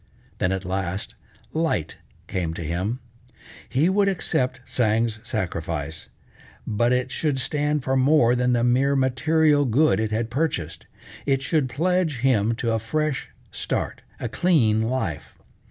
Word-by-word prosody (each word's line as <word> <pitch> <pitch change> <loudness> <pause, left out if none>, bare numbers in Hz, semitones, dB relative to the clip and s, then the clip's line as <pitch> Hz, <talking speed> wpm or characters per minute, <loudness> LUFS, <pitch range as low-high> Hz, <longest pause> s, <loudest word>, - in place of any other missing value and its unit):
Then 90 - +1
at 95 0 -2
last, 95 0 -3 0.4
light 160 - -1 0.3
came 85 -3 -3
to 85 - -5
him. 90 +10 -2 0.7
He 140 +6 +2
would 200 +2 +3
accept 130 -8 -1
Tsang's 110 -1 +1
sacrifice 85 -8 -4 0.6
but 120 +3 +1
it 125 +1 0
should 150 -4 0
stand 150 +1 0
for 130 +1 0
more 130 -2 +4
than 125 0 +2
the 120 -1 +2
mere 130 +3 +3
material 145 +3 +3
good 140 +4 +3
it 110 -1 0
had 110 +1 -2
purchased. 135 - -2 0.4
It 135 -1 +2
should 135 0 +1
pledge 170 +1 +1
him 115 -4 +2
to 115 0 -1
a 115 - +1
fresh 150 +5 -2 0.2
start, - - -3 0.2
a - - -2
clean 120 -12 +2
life. 110 - -3
125 Hz, 140 wpm, -24 LUFS, 110-145 Hz, 0.7 s, more